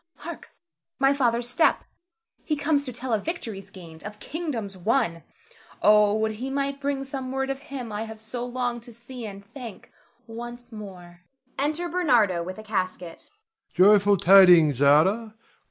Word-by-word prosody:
Hark! 340 +3 -9 0.5
my 270 0 +3
father's 240 -3 0
step! 250 +7 +2 0.6
He 305 - -1
comes 285 0 +1
to 255 - -4
tell 250 0 -4
of 210 - 0
victories 225 - -5
gained, 165 -4 -13
of 210 +1 -8
kingdoms 270 - -5
won. 185 -3 0 0.6
Oh, 210 0 +5
would 220 0 0
he 240 +5 -5
might 275 0 -2
bring 280 -1 -1
some 265 -1 -6
word 270 0 -1
of 270 - -5
him 255 -5 -6
I 210 +2 -3
have 220 -1 -10
so 225 +3 -6
longed 245 -1 -3
to 235 0 -12
see 240 0 -8
and 200 -1 -10
thank 235 -1 -10 0.3
once 240 +1 -9
more! 180 -5 -11 0.4
[Enter 310 +5 0
Bernardo 245 - +2
_with 185 +2 -7
a 215 - -9
casket. 185 -5 -4
240 Hz, 145 wpm, -25 LUFS, 210-270 Hz, 0.6 s, Oh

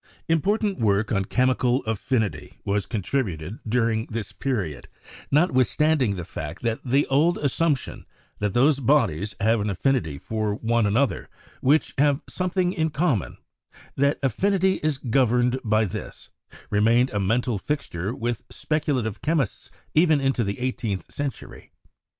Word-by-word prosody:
Important 195 +3 +1
work 105 -1 +1
on 100 -2 +1
chemical 130 +2 +1
affinity 110 0 -2
was 100 0 0
contributed 100 - -2
during 115 -1 +1
this 110 -2 -5
period, 105 - -3 0.4
notwithstanding 140 - +2
the 90 -2 -5
fact 85 0 -7
that 115 -1 0
the 135 +3 +2
old 155 +6 +2
assumption 145 0 -1 0.3
that 105 -2 -1
those 140 +3 +4
bodies 110 - +1
have 110 +1 +2
an 105 - -1
affinity 100 - 0
for 110 +5 -2
one 115 0 +1
an 105 +2 +1
other 140 0 0 0.3
which 145 +4 +2
have 145 0 +3
something 180 0 0
in 160 -4 0
common 145 - 0 0.3
— - - -24
that 140 +2 +2
affinity 190 - +2
is 155 -3 0
governed 125 0 +2
by 110 0 +2
this, 95 - -7 0.4
remained 115 +5 +3
a 105 - -1
mental 115 +3 0
fixture 100 - -3
with 120 -1 -3
specula 150 -5 -1
tive 110 -1 -5
chemists 150 -7 -1 0.2
even 155 -2 +4
into 135 -3 +1
the 100 -1 -3
eighteenth 120 -6 -3
century. 145 -3 -6
125 Hz, 140 wpm, -24 LUFS, 105-145 Hz, 0.4 s, those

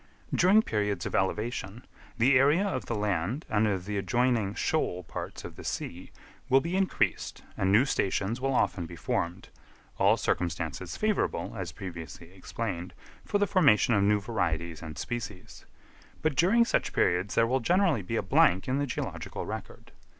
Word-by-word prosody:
During 200 +5 +5
periods 105 - -1
of - - -4
elevation 105 +3 -2 0.3
the 130 +4 +4
area 150 +9 +4
of 200 - -3
the 115 - -2
land 105 - -1
and 110 0 +2
of 95 -3 -1
the 105 0 -3
adjoining 115 0 +1
shoal 90 - -1
parts - - -7
of - - -9
the - - -9
sea 90 +2 -5 0.4
will 135 - +6
be 170 +6 -3
increased 190 -1 0
and 95 0 +1
new 110 +6 +5
stations 105 -1 -1
will 135 0 0
often 90 -8 0
be 85 - -9
formed—all 85 +2 -2
circumstances 85 -4 -2
favourable, - - 0
as - - -4
previously 85 -2 -8
explained, 95 -2 -5 0.3
for 205 - +1
the 205 - +2
formation 140 - +4
of 100 - +3
new 105 +1 +3
varieties 85 -7 -2
and 80 -2 -8
species; 105 -6 -6 0.6
but 155 -3 +1
during 210 - +4
such - - 0
periods 90 +3 +1
there 115 - +4
will 130 +3 +1
generally 175 - +2
be 90 - -4
a - - 0
blank 95 +2 +3
in 130 +2 0
the 145 - 0
geological - - -5
record. - - -8
105 Hz, 165 wpm, -29 LUFS, 90-135 Hz, 0.6 s, will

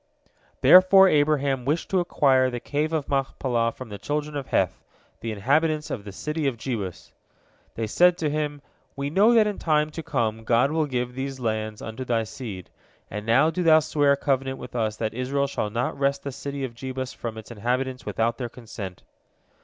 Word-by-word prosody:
Therefore 185 +1 +8
Abraham 145 -5 +2
wished 150 +6 -1
to 190 - +3
acquire 135 -7 +3
the 120 -1 -4
Cave 150 +5 -2
of 155 -3 -1
Machpelah 130 -4 0
from 130 0 -10
the 100 -1 -7
children 150 +5 -3
of 140 -2 -4
Heth, - - 0 0.4
the 115 - -4
inhabitants 150 +8 +1
of 105 -4 -5
the 100 - -7
city 150 +8 -3
of 130 -4 -1
Jebus. 110 -7 -5 0.6
They 115 - -2
said 175 +10 +4
to 155 -4 -1
him. 145 -1 -3 0.3
"We 140 +1 -3
know 205 +7 +5
that 220 -2 +6
in 210 -1 -3
time 150 -1 +1
to 165 - -6
come 115 -7 -1
God 120 +5 +3
will 155 -1 +1
give 125 -2 -2
these 135 +1 -5
lands 110 -2 -3
unto 110 +3 -5
thy 115 -3 0
seed, 105 -4 -8 0.4
and 105 +2 -6
now 135 +8 +4
do 180 +3 -2
thou 160 -2 +6
swear 145 -2 +2
a - - -1
covenant 135 -1 -1
with 125 -1 -10
us 110 -2 0
that 110 -1 -2
Israel 135 +3 -1
shall 135 -6 -2
not 120 +4 -2
wrest 140 0 +1
the 140 - -4
city 140 +1 -5
of 130 -3 -4
Jebus 130 +1 -5
from 115 -2 -6
its 110 +1 -10
inhabitants 125 +4 -2
without 115 +2 -1
their 120 -2 -3
consent." 110 -6 -9
130 Hz, 195 wpm, -25 LUFS, 115-150 Hz, 0.6 s, Therefore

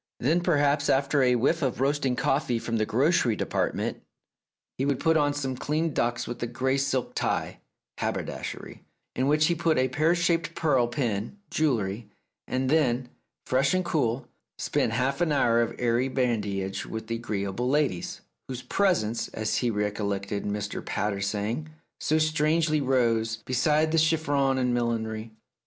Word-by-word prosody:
Then 160 +8 +2
perhaps 145 -4 +2
after 140 +1 +3
a 125 -1 +4
whiff 140 +8 +1
of 130 -4 -1
roasting 135 -1 +1
coffee 135 -2 +1
from 115 0 -2
the 110 -1 0
grocery 130 -2 +2
department, - - -2 0.8
he - - +1
would 140 -2 0
put 160 0 +3
on 145 -2 +2
some 135 -3 -2
clean 155 +4 -1
ducks 120 -1 0
with 120 - -6
a 120 - -1
grey 130 +3 0
silk 135 -2 -1
tie - - -2 0.4
(haberdashery), - - -4 0.3
in 130 - +1
which 150 +1 +4
he 170 - +3
put 165 -1 +1
a 130 0 +2
pear 155 +6 +2
shaped 170 -1 0
pearl 145 -8 +2
pin 120 - -2
(jewellery), 115 -8 0 0.4
and 130 +1 -1
then, 130 -4 +2 0.4
fresh 135 +6 +2
and 185 -1 0
cool, 135 -7 0 0.3
spent - - 0
a - - -1
half 135 +4 0
hour 140 -8 +3
of 115 0 -1
airy 120 +1 +1
badinage 105 -7 -1
with 110 0 -5
the 115 +1 -3
agreeable 105 +1 -2
ladies, 140 -11 0 0.3
"whose 125 -1 -6
presence," 120 - +1
as 110 0 -2
he 120 - +1
recollected 100 -1 -2
Mr. 105 0 -3
Pater 100 0 -2
saying, 105 +9 -2 0.3
"so 155 - +1
strangely 155 0 +2
rose" 115 -4 +1
beside 150 +5 +2
the 165 - +3
chiffon 145 -4 +2
and 125 -1 +1
millinery. 115 -2 -2
130 Hz, 155 wpm, -27 LUFS, 115-150 Hz, 0.8 s, a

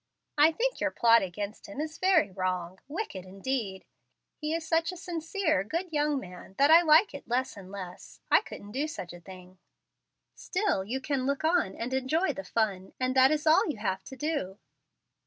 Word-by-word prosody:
"I 300 +2 +6
think - - -1
your - - +2
plot 230 0 +5
against 200 +3 -5
him 200 +7 -8
is 310 +1 -4
very 370 - +3
wrong, 185 -1 -3
wicked, 290 - -5
indeed. 195 +1 -4 0.5
He 305 0 -4
is 325 0 -2
such 330 +1 +2
a 365 - -9
sincere, 335 - -1
good 335 - -4
young 295 -1 +1
man, 180 -2 -11
that 285 +2 +5
I 330 +1 +9
like 325 +4 +5
it 280 - -9
less 255 +3 -1
and 190 -2 -11
less. 185 -3 -9
I - - +7
couldn't 205 - -10
do 280 +6 -1
such 180 - -7
a 175 - -10
thing." 185 0 -13 0.7
"Still 375 - -1
you 250 +7 -3
can 270 -2 -1
look 280 +2 -1
on 320 - +2
and 240 +3 -4
enjoy 295 +6 +1
the 195 - -6
fun, 195 -2 -1
and 255 0 0
that 260 0 +7
is 305 +1 0
all 315 +1 +5
you 295 - -3
have 190 -2 -2
to 265 - -9
do. 265 - -3
260 Hz, 195 wpm, -29 LUFS, 195-315 Hz, 0.7 s, I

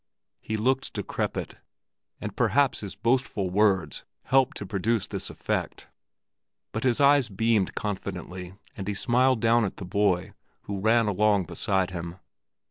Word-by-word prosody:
He 110 - -3
looked 130 +4 0
decrepit, - - -3 0.6
and - - -6
perhaps 140 -2 +2
his 100 -3 -7
boastful 115 -6 0
words 100 -3 +2 0.2
helped 135 0 +2
to 105 - -5
produce 105 +3 0
this - - -4
effect; - - -3 0.8
but 110 - -3
his 125 +1 +2
eyes 140 -3 +5
beamed 110 -1 +1
confidently, 95 -2 -5 0.2
and 95 -2 -6
he 105 - -1
smiled 125 +2 +2
down 115 0 +4
at 100 - -3
the 95 - -6
boy, 95 -1 +1 0.3
who 100 -1 -5
ran 110 +2 +3
along 105 0 +3
beside 95 +2 0
him. 85 0 -6
105 Hz, 140 wpm, -26 LUFS, 95-120 Hz, 0.8 s, eyes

